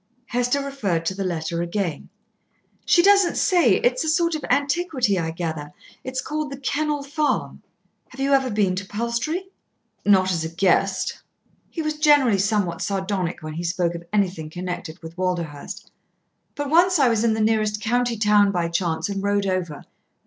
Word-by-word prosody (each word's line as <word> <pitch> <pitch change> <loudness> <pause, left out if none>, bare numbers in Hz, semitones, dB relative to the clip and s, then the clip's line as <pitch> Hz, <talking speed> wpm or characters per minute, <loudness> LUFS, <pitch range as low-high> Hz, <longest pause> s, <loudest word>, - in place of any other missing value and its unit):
Hester 245 +4 0
referred 200 -12 -2
to 190 - 0
the 195 +1 -4
letter 170 -2 -2
again. 175 -3 -3 0.8
"She 345 - +5
doesn't 395 -2 +5
say. 345 - +4
It 245 - +2
is 255 - -2
a - - 0
sort 335 +1 +2
of 310 - -3
antiquity, 280 - +1
I 160 -1 -2
gather. 160 -3 -4 0.3
It's 260 0 -3
called 305 -1 -4
The 275 - -6
Kennel 295 +2 -1
Farm. 290 +2 -1 0.5
Have 260 - -14
you 275 +1 +1
ever 265 -1 +3
been 205 -4 +1
to 195 - -4
Palstrey?" 235 - -2 0.5
"Not 190 -2 +4
as 165 -3 -1
a 160 - -3
guest." 190 +2 +1 0.5
He 325 - -4
was 305 0 -3
generally 290 -9 +4
somewhat 195 -4 0
sardonic 190 -4 -2
when 155 0 -6
he 170 +3 -5
spoke 175 0 0
of 170 - -6
anything 180 -6 0
connected 175 -1 -6
with 165 +1 -9
Walderhurst. 170 -6 -4 0.6
"But 290 -1 -4
once 355 +2 +5
I 275 -4 +4
was 230 -2 +2
in 225 -2 +2
the - - -3
nearest 215 -1 +1
county 240 +2 0
town 210 -1 +4
by 175 -3 -1
chance 170 -1 -1
and 200 -1 -3
rode 200 0 +1
over. 180 -6 -3
205 Hz, 175 wpm, -23 LUFS, 180-275 Hz, 0.8 s, She